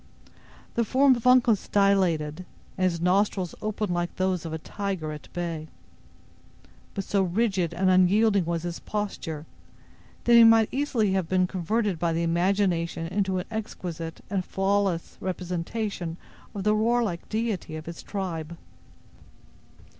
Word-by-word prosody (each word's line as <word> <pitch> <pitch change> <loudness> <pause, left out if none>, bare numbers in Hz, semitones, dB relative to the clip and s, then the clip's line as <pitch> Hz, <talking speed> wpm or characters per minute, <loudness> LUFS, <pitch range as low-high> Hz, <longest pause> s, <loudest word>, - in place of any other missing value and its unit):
The 235 - +1
form 265 +4 +4
of 240 +1 -2
Uncas 245 -5 +4
dilated, 185 -5 +2 0.3
and 185 - +1
his 170 -1 -4
nostrils 185 0 +1
opened 215 -3 -2
like 175 0 -2
those 185 -2 0
of - - -6
a 160 - -2
tiger 190 -2 -4
at 150 -1 -10
bay; 165 -3 -4 1.3
but 195 - -2
so 200 +1 +1
rigid 190 -2 +1
and 185 +3 0
unyielding 195 +2 +4
was 170 0 -2
his 175 -1 -4
posture, 180 -7 -4 0.8
that 240 - +4
he 235 0 +9
might 225 -1 +6
easily 255 -7 +1
have 185 -4 -1
been 185 -1 +3
converted 190 +1 -1
by 170 -1 +1
the 165 +1 0
imagination 170 -1 +1
into 190 -1 0
an 180 - -3
exquisite 175 -7 -5
and 195 -3 -1
faultless 195 -2 -1
representation 180 0 -3 0.4
of 200 - -3
the 210 +1 +3
warlike 220 -4 0
deity 215 -7 -2
of 155 0 -7
his 170 -1 -7
tribe. 170 -5 -5
185 Hz, 140 wpm, -26 LUFS, 170-210 Hz, 1.3 s, he